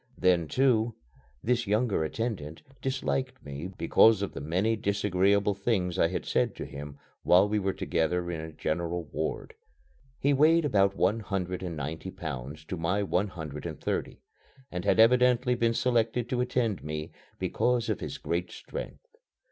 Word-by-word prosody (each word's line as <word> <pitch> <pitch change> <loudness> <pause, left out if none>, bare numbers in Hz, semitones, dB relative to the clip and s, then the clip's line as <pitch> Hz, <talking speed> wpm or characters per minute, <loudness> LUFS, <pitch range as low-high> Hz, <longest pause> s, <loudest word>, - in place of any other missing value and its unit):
Then, 90 -3 +3
too, 120 - +2 0.5
this 120 -1 +1
younger 105 -4 +1
attendant 80 -4 -4 0.2
disliked 130 0 -2
me 70 +4 -5
because 100 +2 +4
of 100 - -4
the 70 - -6
many 95 +10 +1
disagreeable 100 -1 +2
things 95 -3 -1
I - - +5
had 90 - -4
said - - +1
to - - -5
him 70 +1 -8 0.2
while 90 +3 +5
we 105 +1 +1
were 95 -1 0
together 85 0 -1
in 85 - -3
a 80 0 -7
general 85 +3 -2
ward. 80 +1 -4 0.6
He 140 +1 +2
weighed 155 +3 +5
about 100 -7 +3
one 100 +5 +2
hundred 95 -3 -3
and 85 -4 -4
ninety 80 +5 -4
pounds 75 -3 -6
to 90 - -4
my 90 +5 0
one 100 +1 +1
hundred 75 -6 -6
and - - -7
thirty, - - -3 0.5
and 90 +1 -4
had 105 - +3
evidently 125 +2 +5
been 115 -1 +1
selected 120 -1 +1
to 125 -1 0
attend 125 -5 0
me 75 0 -5 0.3
because 120 -2 0
of 110 -4 -1
his - - -5
great 90 +1 -2
strength. - - -8
100 Hz, 165 wpm, -29 LUFS, 85-115 Hz, 0.6 s, I